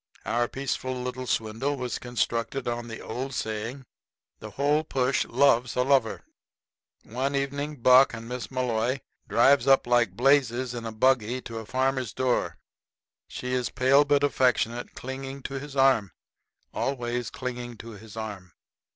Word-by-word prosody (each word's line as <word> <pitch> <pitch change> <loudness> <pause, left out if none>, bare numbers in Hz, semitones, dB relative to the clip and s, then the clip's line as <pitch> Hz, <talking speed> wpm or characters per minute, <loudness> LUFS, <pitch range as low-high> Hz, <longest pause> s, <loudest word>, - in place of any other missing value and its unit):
Our 120 0 +1
peaceful 130 -1 -3
little 125 0 -5
swindle 115 +6 -1
was 125 -2 -3
constructed 120 +1 -2
on 120 0 -3
the 115 -1 -7
old 130 +3 -5
saying: 115 +5 -4 0.5
"The - - -8
whole 145 +3 +1
push 130 -3 0
loves 125 -1 +3
a 125 - +2
lover." 130 -4 +2 0.8
One 130 +5 -2
evening 140 0 -3
Buck 130 +1 +7
and 115 0 -8
Miss 125 0 -5
Malloy 125 0 -1 0.3
drives 135 +2 +4
up 135 0 +5
like 120 -5 +2
blazes 130 -1 +2
in 115 -2 -5
a - - -4
buggy 125 +1 +2
to 115 -2 -6
a 110 - -9
farmer's 130 -1 0
door. 130 -1 0 0.7
She 125 0 -5
is 125 -2 0
pale 135 +3 +4
but 145 0 +2
affectionate, 125 -3 +1
clinging 135 +1 -6
to 135 0 -4
his 145 0 -9
arm 130 - +3 0.6
always 120 -3 -2
clinging 120 -2 -6
to 115 - -10
his 110 +1 -12
arm. 100 -5 -6
125 Hz, 150 wpm, -27 LUFS, 115-135 Hz, 0.8 s, Buck